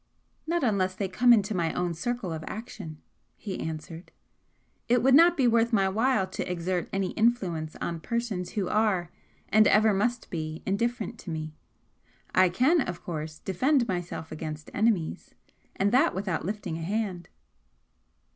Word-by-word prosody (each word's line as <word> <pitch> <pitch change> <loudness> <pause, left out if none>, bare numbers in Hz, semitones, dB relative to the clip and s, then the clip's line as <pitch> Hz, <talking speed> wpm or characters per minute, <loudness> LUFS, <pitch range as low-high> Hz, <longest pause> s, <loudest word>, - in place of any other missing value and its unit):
"Not 340 0 0
unless 190 -5 +1
they 195 0 -2
come 245 +7 +4
into 215 -2 +4
my 170 -4 0
own 175 -1 -1
circle 205 +1 -3
of 160 0 -5
action," 210 -9 -7 0.4
he 195 -3 -5
answered. 160 +2 -6 0.8
"It 240 -1 +3
would 265 0 +5
not 335 +4 +7
be 260 -3 +4
worth 235 0 +3
my 195 -4 +3
while 225 +1 +2
to 185 -1 -5
exert 180 0 -2
any 195 -2 -1
influence 185 -9 0
on 170 -1 -4
persons 205 -2 -3
who 200 -4 -1
are, 195 -5 +1 0.4
and 215 0 +5
ever 215 0 +5
must 235 +5 -1
be, 155 -1 -4
indifferent 230 +3 -1
to - - -9
me. 155 -1 -4 0.8
I 185 -1 +5
can, 270 - +3
of 180 -8 -4
course, 155 -2 -5
defend 250 - +1
myself 175 -4 -4
against 155 -1 -6
enemies 205 -7 0 0.4
and 200 +1 +1
that 275 +7 +3
without 190 -5 -2
lifting 195 -4 -4
a - - -6
hand." 190 -1 -3
195 Hz, 155 wpm, -27 LUFS, 170-230 Hz, 0.8 s, not